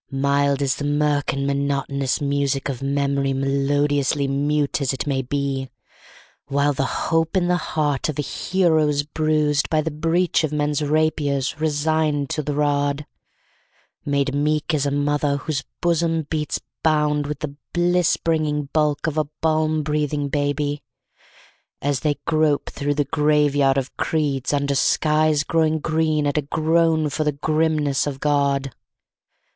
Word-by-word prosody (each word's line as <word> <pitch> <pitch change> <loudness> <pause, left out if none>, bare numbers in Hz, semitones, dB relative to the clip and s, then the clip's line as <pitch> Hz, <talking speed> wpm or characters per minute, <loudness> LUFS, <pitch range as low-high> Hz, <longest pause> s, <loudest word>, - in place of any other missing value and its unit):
Mild 140 +1 +1
is 135 -1 0
the - - -5
mirk 145 0 +1
and 140 +1 -2
monotonous 140 -1 -1
music 140 -1 -1
of 130 -2 -4
memory, 140 0 0
melodiously 140 +1 +1
mute 145 +2 0
as 135 -1 0
it 135 - -3
may 135 -2 0
be, 135 0 -2 0.8
While 140 +1 +1
the 135 0 -1 0.2
hope 165 +3 +1
in 175 -1 +1
the 180 - +3
heart 150 -4 -1
of 150 - -3
a 150 - 0
hero 165 -2 +1
is 145 -1 0
bruised 150 -1 0
by 155 -1 +2
the 160 +1 -3
breach 165 +3 +1
of 155 - -1
men's 150 -1 0
rapiers, 150 -2 0
resigned 155 -1 0
to 160 -1 -1
the 145 0 -3
rod; 145 0 0 1.0
Made 140 -1 0
meek 150 +3 0
as 145 -2 +1
a - - -1
mother 145 0 0
whose 145 -2 -3 0.2
bosom 165 -1 +1
beats 150 -2 -1 0.2
bound 150 -2 +1
with 150 -1 -5
the 145 -2 -4 0.2
bliss 175 0 +2
bringing 150 -3 -1
bulk 150 -1 +1
of 160 -1 0
a 155 - +1
balm 155 -1 +1
breathing 150 -1 -1
baby, 145 0 -1 1.0
As 140 -1 0
they 150 -2 0
grope 155 -2 +1
through 145 +1 -2
the 145 -1 +1
graveyard 145 -2 +2
of 135 -1 -3
creeds, 145 -4 -1
under 140 -1 0
skies 155 +1 +2
growing 160 0 +1
green 155 -1 0
at 145 +1 +1
a - - 0
groan 160 +1 +1
for 155 - -1
the 150 -1 0
grimness 155 -1 0
of 135 -2 -4
God. 140 -3 +1
145 Hz, 150 wpm, -22 LUFS, 140-155 Hz, 1.0 s, the